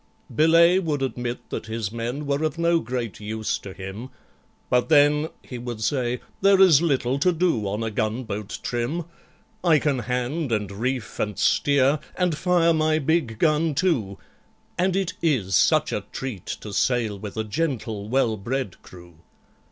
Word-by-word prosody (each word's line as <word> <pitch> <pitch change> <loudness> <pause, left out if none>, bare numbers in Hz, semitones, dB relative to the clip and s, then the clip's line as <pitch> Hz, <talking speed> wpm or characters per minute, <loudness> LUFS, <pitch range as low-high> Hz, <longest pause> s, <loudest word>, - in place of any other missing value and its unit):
BELAYE 170 +3 +5
would 150 -6 -1
admit 125 -2 -4
that - - -4
his 110 -2 -3
men 120 +6 -4
were 140 +1 0
of 155 0 -1
no 170 0 +3
great 120 -3 -4
use 110 +1 -3
to 100 - -9
him, 95 +6 -8 0.6
"But, 125 +3 +1
then," 150 0 +4
he 125 - -8
would 120 -2 -6
say, 125 -1 -1 0.2
"there 195 0 +5
is 175 -6 +7
little 135 -5 +1
to 180 +5 +3
do 165 - 0
on 105 +3 -2
a 110 - -2
gunboat 110 -1 -3
trim 125 +8 -2 0.6
I 165 -4 +5
can 145 -3 0
hand, 125 +4 -2
and 105 -3 -1
reef, 120 +2 -3
and 105 -2 -2
steer, 140 +1 +3 0.2
and 180 -3 +1
fire 170 0 +3
my 155 0 +2
big 155 -6 0
gun 155 +2 +2
too— 130 - 0 0.6
And 185 +1 +1
it 195 -3 -1
is 120 - +1
such - - +3
a - - -2
treat 125 -9 -6
to 105 - -6
sail 115 -5 0
with 105 +1 -8
a 110 - 0
gentle 110 -5 -3
well 120 -3 +1
bred 115 0 -4
crew." 85 -2 -15
130 Hz, 165 wpm, -24 LUFS, 110-155 Hz, 0.6 s, is